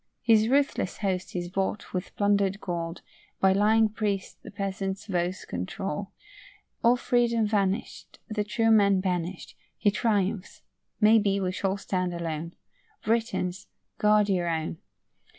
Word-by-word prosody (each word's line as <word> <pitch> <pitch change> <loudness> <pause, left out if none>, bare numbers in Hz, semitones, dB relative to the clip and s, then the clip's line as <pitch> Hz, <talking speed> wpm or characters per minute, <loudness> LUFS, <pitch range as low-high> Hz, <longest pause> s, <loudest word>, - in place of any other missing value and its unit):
His 220 -2 +5
ruthless 275 -8 +1
host 190 -3 -2
is 175 -1 -2
bought 195 +3 -3
with 185 0 -4
plunder'd 200 -1 +2
gold, 170 -2 -4 0.4
By 190 0 +4
lying 220 +3 +4
priest's 205 -2 -2
the - - -10
peasant's 195 0 -4
votes 180 -2 -2
controlled. 150 - -4 0.8
All 235 +1 +6
freedom 235 -2 +2
vanish'd, 205 0 -1
The 215 -3 -1
true 225 +2 +1
men 200 -3 +5
banished, 180 -1 -3 0.2
He 205 - +3
triumphs; 205 -2 -1 0.4
maybe, 210 -2 +4
we 185 -2 -1
shall 190 +1 -1
stand 185 -3 -2
alone. 165 0 -4 0.5
Britons, 220 -5 -1 0.3
guard 210 0 +4
your 180 -3 +1
own. 160 0 -2
195 Hz, 130 wpm, -27 LUFS, 185-215 Hz, 0.8 s, All